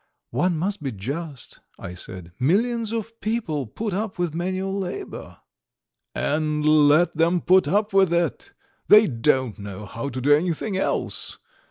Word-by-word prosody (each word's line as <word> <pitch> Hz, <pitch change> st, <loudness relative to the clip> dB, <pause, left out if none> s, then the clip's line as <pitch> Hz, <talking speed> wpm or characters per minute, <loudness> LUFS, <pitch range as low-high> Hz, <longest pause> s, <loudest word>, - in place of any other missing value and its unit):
"One 180 Hz, -2 st, +1 dB
must 195 Hz, +3 st, -2 dB
be 135 Hz, -3 st, -3 dB
just," 140 Hz, -, -6 dB, 0.2 s
I 90 Hz, -, -7 dB
said. 90 Hz, -1 st, -8 dB
"Millions 220 Hz, -, +1 dB
of 230 Hz, 0 st, -5 dB
people 185 Hz, -, -2 dB
put 210 Hz, -, -4 dB
up 205 Hz, +1 st, -3 dB
with 175 Hz, -3 st, -1 dB
manual 185 Hz, +3 st, -2 dB
labour." 380 Hz, -, -6 dB, 0.8 s
"And 150 Hz, 0 st, 0 dB
let 155 Hz, +3 st, +5 dB
them 170 Hz, +3 st, +2 dB
put 185 Hz, +2 st, +4 dB
up 205 Hz, +1 st, +1 dB
with 190 Hz, -3 st, +4 dB
it! 175 Hz, -, -1 dB, 0.4 s
They 215 Hz, +1 st, +8 dB
don't 130 Hz, -, 0 dB
know 100 Hz, 0 st, -7 dB
how 115 Hz, +8 st, -5 dB
to 130 Hz, -, -5 dB
do 145 Hz, +3 st, +4 dB
anything 175 Hz, +6 st, 0 dB
else! 190 Hz, -, -2 dB
170 Hz, 150 wpm, -24 LUFS, 140-195 Hz, 0.8 s, They